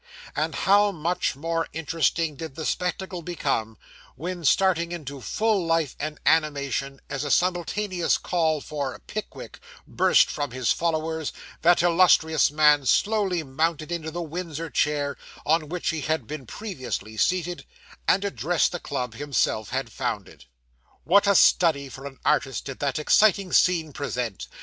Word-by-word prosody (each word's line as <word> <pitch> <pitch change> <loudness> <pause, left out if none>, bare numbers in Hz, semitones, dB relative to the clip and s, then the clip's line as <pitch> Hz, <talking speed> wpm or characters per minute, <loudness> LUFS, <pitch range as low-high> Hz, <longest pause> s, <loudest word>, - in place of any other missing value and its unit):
And - - -1
how 205 +1 +4
much 170 -3 -1
more 165 +3 -2
interesting 160 0 0
did 160 -1 -7
the 160 - -5
spectacle 180 0 -2
become, 135 -10 -2 0.4
when, 175 +5 -5
starting 170 +2 +2
into 140 -5 -6
full 215 - 0
life 165 -4 0
and 150 +1 -4
animation, 140 -3 +1
as 140 - -3
a 145 - -3
simultaneous 180 +2 +1
call 160 -4 0
for 140 -4 -4
'Pickwick' 215 0 -7 0.3
burst - - +3
from 145 -1 -3
his 125 -1 0
followers, 160 -2 -1 0.3
that 175 +1 +4
illustrious 165 -2 +4
man 150 -2 +4
slowly 200 - +2
mounted 155 +3 -1
into 165 -2 -3
the 175 +2 -4
Windsor 165 -1 -5
chair, 145 -1 0 0.3
on 155 -1 +1
which 180 +1 -2
he 160 -2 -2
had 155 +2 -1
been 145 -4 -7
previously 125 - -5
seated, 175 +7 -1 0.4
and 195 +2 +3
addressed 160 - +1
the 175 - -4
club 125 -7 -4
himself 125 -5 -1
had 130 -2 -3
founded. 110 - -5 0.6
What 200 +8 +4
a 200 - +4
study 155 -9 +4
for 135 +2 -8
an 135 -1 -11
artist 135 -5 +1
did 135 -2 -7
that 140 -2 -1
exciting 195 +4 +3
scene 165 -5 +3
present! 125 -8 -4
160 Hz, 145 wpm, -25 LUFS, 140-175 Hz, 0.6 s, how